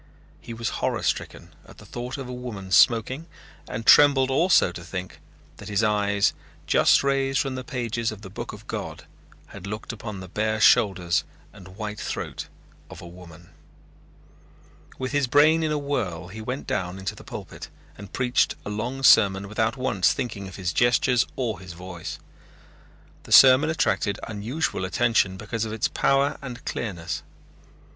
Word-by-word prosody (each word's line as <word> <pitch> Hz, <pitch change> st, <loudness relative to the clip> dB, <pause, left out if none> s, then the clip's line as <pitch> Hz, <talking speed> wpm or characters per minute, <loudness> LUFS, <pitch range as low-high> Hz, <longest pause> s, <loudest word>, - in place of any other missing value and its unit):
He -, -, -10 dB
was 115 Hz, 0 st, -2 dB
horror -, -, -1 dB
stricken -, -, -3 dB
at -, -, -16 dB
the -, -, -14 dB
thought 125 Hz, +3 st, -6 dB
of 135 Hz, -2 st, -6 dB
a 125 Hz, -, -6 dB
woman 110 Hz, -7 st, -7 dB
smoking 125 Hz, -, +3 dB, 0.4 s
and 115 Hz, +1 st, -5 dB
trembled 135 Hz, -1 st, +6 dB
also 165 Hz, -, +4 dB
to 90 Hz, 0 st, -9 dB
think 90 Hz, +1 st, -7 dB, 0.4 s
that -, -, -10 dB
his 105 Hz, +2 st, +1 dB
eyes, 105 Hz, -1 st, +2 dB, 0.3 s
just -, -, +4 dB
raised 135 Hz, -1 st, +1 dB
from 135 Hz, -1 st, -1 dB
the 130 Hz, 0 st, -5 dB
pages 120 Hz, -4 st, -2 dB
of 105 Hz, -1 st, -10 dB
the 95 Hz, -, -8 dB
book -, -, -6 dB
of -, -, -12 dB
God, -, -, -6 dB, 0.4 s
had 95 Hz, -, -9 dB
looked 105 Hz, +4 st, -5 dB
upon 105 Hz, -3 st, -7 dB
the 95 Hz, -, -8 dB
bare 110 Hz, +3 st, -1 dB
shoulders 90 Hz, -7 st, +3 dB, 0.3 s
and 95 Hz, -2 st, -14 dB
white 105 Hz, -1 st, -5 dB
throat -, -, -5 dB, 0.4 s
of -, -, -11 dB
a 85 Hz, -, -10 dB
woman. 85 Hz, -1 st, -14 dB, 1.5 s
With 130 Hz, -1 st, -4 dB
his 145 Hz, -2 st, +1 dB
brain 150 Hz, +5 st, +5 dB
in 155 Hz, -1 st, 0 dB
a 150 Hz, -, 0 dB
whirl 100 Hz, -, -3 dB
he 110 Hz, +3 st, -8 dB
went 125 Hz, +5 st, -5 dB
down 90 Hz, -2 st, -3 dB
into 95 Hz, 0 st, -4 dB
the -, -, -13 dB
pulpit -, -, -9 dB, 0.3 s
and 100 Hz, 0 st, -11 dB
preached 125 Hz, -1 st, +1 dB
a 105 Hz, -, -4 dB
long 120 Hz, +6 st, -4 dB
sermon 100 Hz, -5 st, +5 dB
without 110 Hz, +4 st, -1 dB
once 105 Hz, -8 st, +2 dB
thinking 105 Hz, -5 st, -5 dB
of 95 Hz, -, -10 dB
his 90 Hz, -3 st, -3 dB
gestures 120 Hz, +4 st, +3 dB
or 120 Hz, -4 st, -2 dB
his 90 Hz, -2 st, -10 dB
voice. 90 Hz, -1 st, -8 dB, 1.0 s
The -, -, -14 dB
sermon 135 Hz, +3 st, +8 dB
attracted 100 Hz, -9 st, 0 dB
unusual 110 Hz, +4 st, -3 dB
attention 95 Hz, +1 st, +1 dB
because 110 Hz, +3 st, -4 dB
of 110 Hz, -, -4 dB
its 110 Hz, -1 st, 0 dB
power 140 Hz, +1 st, +1 dB
and 125 Hz, -3 st, -8 dB
clearness. 85 Hz, -7 st, -4 dB
110 Hz, 165 wpm, -25 LUFS, 95-130 Hz, 1.5 s, sermon